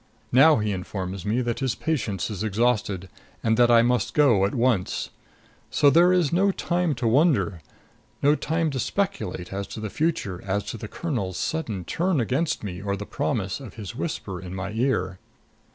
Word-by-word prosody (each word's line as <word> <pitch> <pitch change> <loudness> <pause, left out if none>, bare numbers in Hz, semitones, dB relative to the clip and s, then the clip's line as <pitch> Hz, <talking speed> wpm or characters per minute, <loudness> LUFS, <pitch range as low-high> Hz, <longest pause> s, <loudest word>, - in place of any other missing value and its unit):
Now 150 +5 +7
he 105 -1 0
informs 95 0 -5
me 115 +4 +1
that 120 -2 -2
his 130 -3 0
patience 110 - -2
is 105 0 -4
exhausted 105 -3 0 0.4
and 110 0 +3
that 120 -1 +5
I 115 -1 +6
must 120 -3 0
go 120 -10 +5
at 100 - -2
once. 120 -6 0 0.6
So 145 - +4
there 175 +3 +6
is 175 -5 +2
no 195 +3 +3
time 175 -4 0
to 120 -1 -1
wonder; 125 - +2 0.6
no 145 +1 +6
time 160 +1 0
to 135 - -3
speculate 120 - -2
as 100 0 -3
to - - -7
the 110 -2 -5
future, 155 - -1
as 100 +1 -1
to - - -6
the 110 - -7
colonel's 110 - -3
sudden 110 - -3
turn 175 -2 0
against 130 +7 0
me 90 -3 -5
or 100 0 -2
the 105 - -6
promise 115 -8 -2
of 130 -8 -10
his 105 -2 -7
whisper 105 - -4
in 90 0 -7
my 95 +1 -4
ear. 105 -6 0
115 Hz, 185 wpm, -25 LUFS, 100-150 Hz, 0.6 s, Now